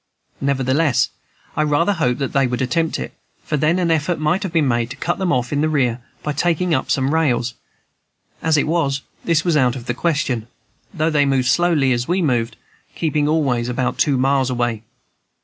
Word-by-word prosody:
Nevertheless, 135 Hz, -1 st, +1 dB, 0.5 s
I -, -, +1 dB
rather 155 Hz, +6 st, +2 dB
hoped 125 Hz, -9 st, 0 dB
that 135 Hz, -2 st, -3 dB
they 135 Hz, -2 st, +3 dB
would 125 Hz, +1 st, -2 dB
attempt 165 Hz, +5 st, 0 dB
it, -, -, -6 dB, 0.3 s
for 150 Hz, -, -2 dB
then 155 Hz, +4 st, +2 dB
an 175 Hz, -2 st, +1 dB
effort 160 Hz, +2 st, +1 dB
might 155 Hz, +5 st, 0 dB
have 190 Hz, -, -3 dB
been 160 Hz, -4 st, +2 dB
made 120 Hz, -1 st, 0 dB
to -, -, -7 dB
cut 175 Hz, -, -2 dB
them 185 Hz, -2 st, 0 dB
off 125 Hz, 0 st, 0 dB
in 145 Hz, -, +1 dB
the 155 Hz, -, +2 dB
rear 125 Hz, -5 st, 0 dB, 0.2 s
by 150 Hz, -, -2 dB
taking 170 Hz, +3 st, +1 dB
up 130 Hz, -, 0 dB
some 135 Hz, +2 st, +1 dB
rails. 125 Hz, -7 st, +1 dB, 0.9 s
As 160 Hz, -1 st, +2 dB
it 145 Hz, -, +2 dB
was, 145 Hz, -4 st, 0 dB, 0.2 s
this 165 Hz, -1 st, +2 dB
was 170 Hz, -3 st, +2 dB
out 130 Hz, -4 st, +3 dB
of 120 Hz, -3 st, -8 dB
the 125 Hz, -, -1 dB
question, 130 Hz, -6 st, -1 dB, 0.4 s
though 160 Hz, -3 st, 0 dB
they 145 Hz, -2 st, +3 dB
moved 130 Hz, -2 st, +1 dB
slowly, 160 Hz, -4 st, +3 dB
as 120 Hz, 0 st, -2 dB
we 180 Hz, +2 st, +1 dB
moved, 120 Hz, -8 st, 0 dB, 0.4 s
keeping 150 Hz, -2 st, 0 dB
always 135 Hz, -6 st, +1 dB
about 125 Hz, 0 st, -2 dB
two 140 Hz, -3 st, +3 dB
miles 135 Hz, 0 st, +2 dB
away. 120 Hz, -3 st, -1 dB
145 Hz, 200 wpm, -20 LUFS, 125-160 Hz, 0.9 s, they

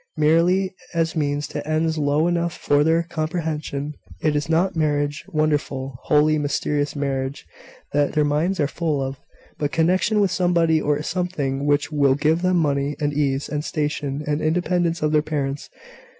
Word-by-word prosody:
"Merely 170 Hz, +5 st, +3 dB, 0.2 s
as 165 Hz, 0 st, 0 dB
means 145 Hz, -1 st, -1 dB
to -, -, -5 dB
ends 160 Hz, +1 st, +1 dB
low 145 Hz, +2 st, +2 dB
enough 170 Hz, -1 st, -1 dB
for 145 Hz, 0 st, +2 dB
their 165 Hz, +2 st, +3 dB
comprehension. 155 Hz, -3 st, -3 dB, 0.3 s
It 155 Hz, -1 st, +1 dB
is 145 Hz, +2 st, -1 dB
not 175 Hz, +4 st, +2 dB
marriage 145 Hz, -2 st, 0 dB
wonderful, 140 Hz, -4 st, -1 dB
holy, 155 Hz, +1 st, +3 dB
mysterious 145 Hz, 0 st, -1 dB
marriage 135 Hz, -1 st, -3 dB, 0.5 s
that 145 Hz, 0 st, +2 dB
their 150 Hz, -1 st, +2 dB
minds 160 Hz, +6 st, 0 dB
are 145 Hz, -, +3 dB
full 155 Hz, -1 st, -1 dB
of, 135 Hz, 0 st, -3 dB, 0.4 s
but 145 Hz, -1 st, -1 dB
connection 185 Hz, +6 st, +2 dB
with 200 Hz, -3 st, +2 dB
somebody 170 Hz, -4 st, +2 dB
or 150 Hz, 0 st, 0 dB
something 150 Hz, -6 st, -2 dB
which 145 Hz, +1 st, +1 dB
will 140 Hz, -3 st, +3 dB
give 155 Hz, +4 st, +1 dB
them 185 Hz, 0 st, +2 dB
money, 145 Hz, -2 st, 0 dB
and 145 Hz, -1 st, 0 dB
ease, 140 Hz, -1 st, 0 dB
and 150 Hz, 0 st, -3 dB
station, 150 Hz, -2 st, -2 dB
and 150 Hz, +1 st, -1 dB
independence 170 Hz, 0 st, 0 dB
of 150 Hz, -, +2 dB
their 155 Hz, -1 st, +4 dB
parents. 145 Hz, -2 st, -3 dB
150 Hz, 165 wpm, -22 LUFS, 145-165 Hz, 0.5 s, their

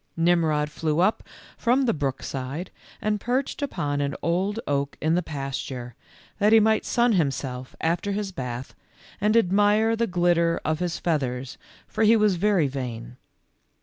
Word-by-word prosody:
Nimrod 165 Hz, -3 st, +2 dB
flew 155 Hz, 0 st, -1 dB
up 190 Hz, +5 st, +2 dB, 0.4 s
from 255 Hz, +3 st, +3 dB
the 245 Hz, -, +2 dB
brook 135 Hz, -3 st, -3 dB
side, 140 Hz, +7 st, -5 dB, 0.3 s
and 210 Hz, -1 st, 0 dB
perched 260 Hz, +4 st, -1 dB
upon 145 Hz, -, -2 dB
an 140 Hz, -1 st, -2 dB
old 190 Hz, +6 st, 0 dB
oak 140 Hz, 0 st, -1 dB
in 155 Hz, +2 st, +1 dB
the 180 Hz, -, +2 dB
pasture, 135 Hz, -5 st, -5 dB, 0.5 s
that 210 Hz, +1 st, +4 dB
he 225 Hz, -, +8 dB
might 220 Hz, 0 st, +2 dB
sun 240 Hz, 0 st, +2 dB
himself 135 Hz, -6 st, -2 dB
after 170 Hz, +5 st, 0 dB
his 200 Hz, -1 st, -2 dB
bath, 125 Hz, -5 st, -6 dB, 0.5 s
and 215 Hz, +3 st, +3 dB
admire 210 Hz, +2 st, +3 dB
the 230 Hz, +1 st, 0 dB
glitter 175 Hz, -2 st, +2 dB
of 155 Hz, 0 st, 0 dB
his 175 Hz, -1 st, -2 dB
feathers, 130 Hz, -6 st, -2 dB, 0.3 s
for -, -, -1 dB
he 220 Hz, +1 st, +6 dB
was 210 Hz, -4 st, +3 dB
very 190 Hz, -5 st, +2 dB
vain. 125 Hz, -3 st, -6 dB
170 Hz, 155 wpm, -25 LUFS, 140-210 Hz, 0.5 s, he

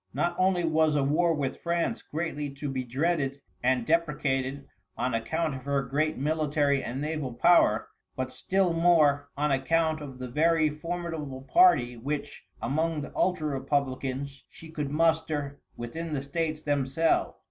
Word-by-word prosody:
Not 175 Hz, 0 st, 0 dB
only 185 Hz, -1 st, +3 dB
was 160 Hz, -2 st, +2 dB
a 145 Hz, -, +2 dB
war 165 Hz, +5 st, +2 dB
with 140 Hz, -3 st, -3 dB
France 170 Hz, +7 st, -1 dB
greatly 150 Hz, -2 st, -4 dB
to 145 Hz, +1 st, -5 dB
be 130 Hz, -1 st, -2 dB
dreaded 140 Hz, +2 st, -1 dB, 0.2 s
and 125 Hz, -1 st, +1 dB
deprecated 140 Hz, -4 st, 0 dB, 0.3 s
on 125 Hz, -, -1 dB
account 155 Hz, +7 st, -1 dB
of 130 Hz, -1 st, -8 dB
her 140 Hz, -1 st, +1 dB
great 150 Hz, +5 st, -1 dB
military 145 Hz, -1 st, +1 dB
and 125 Hz, +3 st, -4 dB
naval 150 Hz, -3 st, -3 dB
power, 120 Hz, -6 st, +4 dB, 0.3 s
but 130 Hz, 0 st, -3 dB
still 185 Hz, +5 st, +1 dB
more 155 Hz, -4 st, +3 dB
on 150 Hz, 0 st, +1 dB
account 155 Hz, +3 st, +1 dB
of 135 Hz, -3 st, -8 dB
the 130 Hz, 0 st, -5 dB
very 155 Hz, +3 st, +2 dB
formidable 160 Hz, -4 st, -5 dB
party 135 Hz, -, +4 dB
which, 145 Hz, +5 st, -5 dB, 0.2 s
among 155 Hz, +5 st, 0 dB
the 145 Hz, -, -7 dB
ultra 170 Hz, -5 st, +1 dB
Republicans, 135 Hz, 0 st, -2 dB
she 160 Hz, -1 st, -13 dB
could 150 Hz, -3 st, -3 dB
muster 155 Hz, -2 st, 0 dB, 0.2 s
within 155 Hz, +8 st, -5 dB
the 135 Hz, -2 st, -2 dB
States 155 Hz, +2 st, -2 dB
themselves. 145 Hz, +2 st, +1 dB
150 Hz, 150 wpm, -28 LUFS, 135-165 Hz, 0.3 s, power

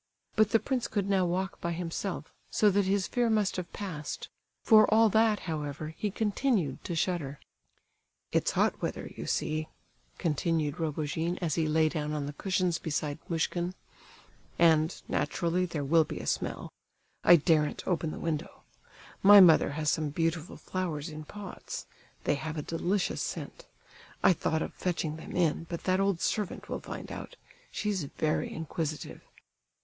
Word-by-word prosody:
But 215 Hz, -1 st, +4 dB
the 225 Hz, -, +4 dB
prince 255 Hz, -1 st, -1 dB
could 200 Hz, -3 st, -1 dB
now 195 Hz, -2 st, +3 dB
walk 190 Hz, +3 st, -2 dB
by 170 Hz, 0 st, -1 dB
himself, 170 Hz, 0 st, -4 dB, 0.2 s
so 210 Hz, -1 st, +4 dB
that 200 Hz, 0 st, +2 dB
his 195 Hz, 0 st, +1 dB
fear 240 Hz, -1 st, +1 dB
must 215 Hz, -3 st, +2 dB
have 180 Hz, -2 st, -5 dB
passed; 165 Hz, -8 st, -5 dB, 0.3 s
for 215 Hz, -2 st, +6 dB
all 225 Hz, 0 st, +6 dB
that, 220 Hz, 0 st, +3 dB
however, 155 Hz, -2 st, -4 dB
he 210 Hz, -, -2 dB
continued 205 Hz, -, 0 dB
to 175 Hz, -, -3 dB
shudder. 160 Hz, -5 st, -1 dB, 0.9 s
"It's -, -, +1 dB
hot -, -, +1 dB
weather, -, -, -3 dB
you -, -, -6 dB
see," 155 Hz, 0 st, -1 dB, 0.5 s
continued 160 Hz, -2 st, 0 dB
Rogojin, 160 Hz, +2 st, -1 dB
as 165 Hz, -5 st, -1 dB
he 160 Hz, 0 st, +1 dB
lay 155 Hz, +1 st, +3 dB
down 150 Hz, -2 st, -2 dB
on 150 Hz, -2 st, -2 dB
the 145 Hz, -, -5 dB
cushions 180 Hz, 0 st, 0 dB
beside 150 Hz, -1 st, -2 dB
Muishkin, 175 Hz, +2 st, -1 dB, 0.8 s
"and, 160 Hz, 0 st, +4 dB
naturally, 180 Hz, +2 st, 0 dB
there 155 Hz, -4 st, -3 dB
will 160 Hz, +3 st, +5 dB
be -, -, -6 dB
a -, -, -6 dB
smell. -, -, -2 dB, 0.5 s
I 175 Hz, -, +9 dB
daren't 155 Hz, -2 st, +2 dB
open 170 Hz, -3 st, 0 dB
the -, -, -6 dB
window. 160 Hz, -3 st, -4 dB, 0.6 s
My 205 Hz, +1 st, +10 dB
mother 165 Hz, -6 st, +7 dB
has 150 Hz, 0 st, +1 dB
some 155 Hz, -2 st, 0 dB
beautiful 165 Hz, +2 st, -2 dB
flowers 170 Hz, -4 st, -3 dB
in 155 Hz, 0 st, -8 dB
pots; 205 Hz, +2 st, -7 dB, 0.4 s
they -, -, +2 dB
have 155 Hz, +2 st, -4 dB
a 150 Hz, -, -2 dB
delicious 180 Hz, +5 st, -1 dB
scent; -, -, -5 dB, 0.6 s
I -, -, +7 dB
thought 160 Hz, -1 st, 0 dB
of -, -, -6 dB
fetching 165 Hz, -4 st, -2 dB
them 160 Hz, -, -8 dB
in, 165 Hz, -1 st, +1 dB
but 170 Hz, -2 st, -5 dB
that 185 Hz, 0 st, +2 dB
old 195 Hz, -3 st, +1 dB
servant 210 Hz, -3 st, -2 dB
will -, -, -2 dB
find -, -, -7 dB
out, -, -, -7 dB, 0.3 s
she's 205 Hz, -5 st, -1 dB
very 155 Hz, +2 st, -1 dB
inquisitive." 160 Hz, -1 st, -4 dB
170 Hz, 160 wpm, -30 LUFS, 155-190 Hz, 0.9 s, My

